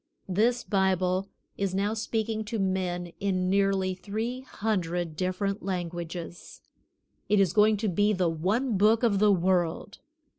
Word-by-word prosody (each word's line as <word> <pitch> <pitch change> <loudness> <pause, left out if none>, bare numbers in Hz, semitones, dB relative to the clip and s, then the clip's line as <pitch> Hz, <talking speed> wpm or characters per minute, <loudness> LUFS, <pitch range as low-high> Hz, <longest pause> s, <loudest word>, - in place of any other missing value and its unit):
This 225 +6 +1
Bible 190 -1 +1 0.3
is 195 -2 -1
now 200 +2 0
speaking 220 0 -2
to 225 +2 -3
men 180 -3 -2
in 185 -2 0
nearly 195 -1 +2
three 220 +7 -4
hundred 180 -9 -2
different 190 +3 -2
languages. 175 -2 -5 0.7
It 210 0 +4
is 190 -4 +3
going 210 0 +4
to 215 +2 -2
be 205 +3 +2
the 185 -3 +1
one 200 +8 0
Book 220 +3 +4
of 205 -5 +3
the 210 0 +5
world. 180 0 0
195 Hz, 140 wpm, -27 LUFS, 180-210 Hz, 0.7 s, the